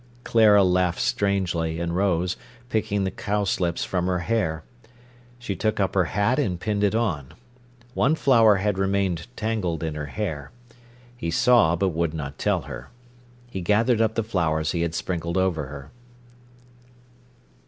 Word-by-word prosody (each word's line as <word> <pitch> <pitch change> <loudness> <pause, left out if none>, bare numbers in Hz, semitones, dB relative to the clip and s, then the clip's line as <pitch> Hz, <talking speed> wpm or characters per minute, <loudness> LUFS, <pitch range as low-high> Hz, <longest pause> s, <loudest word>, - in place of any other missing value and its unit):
Clara 105 -3 +5
laughed 90 -1 +1
strangely, 85 -5 0
and 85 0 -2
rose, 90 -2 +1 0.3
picking 105 -3 0
the 95 - -1
cowslips 100 -4 -1
from 90 -1 -1
her 90 -1 +1
hair. 85 -5 -1 0.7
She 120 -5 -4
took 110 +2 -1
up 95 -2 +1
her 95 -2 +3
hat 105 - +1
and 95 -11 -1
pinned 105 +2 -1
it 105 +1 +2
on. 85 - -2 0.6
One 140 +3 +2
flower 115 -8 +5
had 100 0 -1
remained 95 -3 0
tangled 105 -8 -2
in 80 -1 -2
her 75 -1 -5
hair. 75 -9 -4 0.7
He 85 -9 -4
saw, 110 -2 +4
but 95 +3 +1
would 85 -1 -1
not 70 -3 -6
tell - - +1
her. - - -9 0.6
He 110 -6 -6
gathered 110 +5 +2
up 110 -1 +1
the 115 - 0
flowers 80 -7 0
he 85 - -1
had 85 -1 -1
sprinkled 85 0 -2
over 90 -6 0
her. 70 0 -10
95 Hz, 155 wpm, -24 LUFS, 85-105 Hz, 0.7 s, Clara